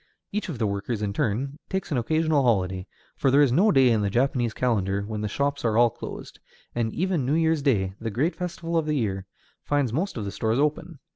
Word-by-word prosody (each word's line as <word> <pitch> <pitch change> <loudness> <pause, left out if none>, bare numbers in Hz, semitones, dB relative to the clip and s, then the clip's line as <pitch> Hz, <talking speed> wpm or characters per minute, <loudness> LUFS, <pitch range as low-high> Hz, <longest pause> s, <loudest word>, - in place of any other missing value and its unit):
Each 210 -1 -3
of 155 - -4
the 115 - 0
workers, 100 +2 -2
in 100 -1 -1
turn, 130 +8 -1
takes 190 -3 -3
an 140 - +1
occasional 155 +3 +2
holiday, 95 -6 +1 0.3
for 135 - +1
there 140 +3 +6
is 135 - +3
no 195 - +4
day 135 -6 +5
in 110 -2 +2
the 100 - +1
Japanese 120 +1 +1
calendar 100 -5 0
when 105 0 -4
the 105 - -1
shops 140 +6 -1
are 115 -2 +1
all 120 -1 +5
closed; - - -9 0.3
and 115 -2 -1
even 180 - 0
New 135 +5 +1
Year's 160 -2 +2
Day, 100 -10 +1
the 115 - -2
great 140 - 0
festival 170 -2 -3
of 160 -2 0
the 150 - +1
year, 95 -6 -2 0.4
finds 145 -5 0
most 175 +5 -1
of 105 - -3
the 100 - -4
stores 110 +3 0
open. 150 +3 -1
125 Hz, 225 wpm, -25 LUFS, 105-155 Hz, 0.4 s, there